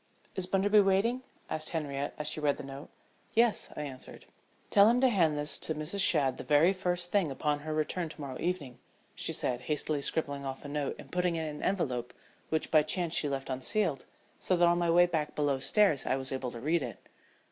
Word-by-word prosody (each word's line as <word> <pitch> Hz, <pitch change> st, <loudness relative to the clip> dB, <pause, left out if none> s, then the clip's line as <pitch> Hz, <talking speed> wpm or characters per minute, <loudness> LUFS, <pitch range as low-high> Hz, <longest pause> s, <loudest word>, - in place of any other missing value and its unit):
"Is 185 Hz, -2 st, -2 dB
Bunderby 200 Hz, +3 st, +4 dB
waiting?" 205 Hz, +6 st, +2 dB, 0.3 s
asked 155 Hz, 0 st, -2 dB
Henriette 145 Hz, -3 st, -3 dB
as 150 Hz, -, -3 dB
she 155 Hz, -, +2 dB
read 145 Hz, -2 st, +1 dB
the -, -, -7 dB
note. 135 Hz, +2 st, -9 dB, 0.5 s
"Yes," 230 Hz, -1 st, +3 dB
I 150 Hz, -, -3 dB
answered. 130 Hz, -3 st, -9 dB, 0.5 s
"Tell 205 Hz, +1 st, +7 dB
him 240 Hz, +2 st, +3 dB
to 260 Hz, -, +5 dB
hand 165 Hz, -9 st, +2 dB
this 145 Hz, 0 st, -1 dB
to 160 Hz, -, -2 dB
Mrs. 155 Hz, +6 st, -4 dB
Shadd 135 Hz, -7 st, +3 dB
the -, -, -5 dB
very 155 Hz, +5 st, +4 dB
first 180 Hz, -2 st, -2 dB
thing 195 Hz, -6 st, +2 dB
upon 145 Hz, +2 st, -1 dB
her 155 Hz, +2 st, -6 dB
return 155 Hz, +2 st, -1 dB
to 155 Hz, -, -12 dB
morrow 135 Hz, -3 st, -6 dB
evening," 165 Hz, -8 st, -3 dB, 0.3 s
she -, -, -2 dB
said, 125 Hz, -1 st, -2 dB
hastily 150 Hz, +1 st, -1 dB
scribbling 140 Hz, -1 st, -2 dB
off 135 Hz, +1 st, -6 dB
a -, -, -4 dB
note 145 Hz, -1 st, -2 dB
and -, -, -13 dB
putting 180 Hz, -1 st, 0 dB
it 160 Hz, -, -2 dB
in 150 Hz, -1 st, -6 dB
an -, -, -9 dB
envelope, 125 Hz, -11 st, -1 dB, 0.3 s
which 160 Hz, -1 st, -1 dB
by 155 Hz, -, +6 dB
chance 165 Hz, +2 st, -2 dB
she 150 Hz, -, +2 dB
left 135 Hz, -1 st, -3 dB
unsealed, 140 Hz, -, -1 dB, 0.3 s
so 185 Hz, -, +1 dB
that 175 Hz, 0 st, +5 dB
on 175 Hz, 0 st, +3 dB
my 170 Hz, -1 st, +1 dB
way 175 Hz, +1 st, +6 dB
back 160 Hz, -4 st, -2 dB
below 145 Hz, -2 st, +1 dB
stairs 190 Hz, -1 st, +2 dB
I -, -, +2 dB
was 130 Hz, -1 st, -4 dB
able 130 Hz, -1 st, -3 dB
to 120 Hz, -, -8 dB
read 155 Hz, +6 st, +1 dB
it. 125 Hz, -3 st, -5 dB
155 Hz, 220 wpm, -30 LUFS, 140-180 Hz, 0.5 s, Tell